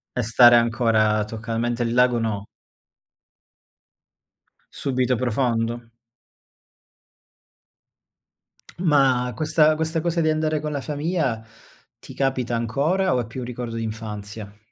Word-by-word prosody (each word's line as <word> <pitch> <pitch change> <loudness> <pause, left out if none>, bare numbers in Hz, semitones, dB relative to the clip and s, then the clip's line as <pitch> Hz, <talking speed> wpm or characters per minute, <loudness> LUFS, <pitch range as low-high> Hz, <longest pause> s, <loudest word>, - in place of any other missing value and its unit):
E 125 - 0
stare 120 +2 +6
ancora 115 -2 +2
toccalmente 115 +2 -3
il 115 0 -2
lago 125 -1 +3
no. 105 -3 -3 2.2
Subito 130 -2 -1
profondo. 120 -1 -1 2.9
Ma 135 -7 +2
questa 155 +1 +3
questa 160 +1 -1
cosa 170 0 0
di 155 - +2
andare 155 0 0
con 150 0 -4
la 140 -2 -3
famiglia 150 -6 -2 0.5
ti - - -12
capita 130 -3 -1
ancora 145 - 0
o - - +1
è - - -6
più 115 +4 -8
un 125 - -5
ricordo 120 -1 -6
d'infanzia? 105 -2 -6
125 Hz, 110 wpm, -23 LUFS, 115-150 Hz, 2.9 s, stare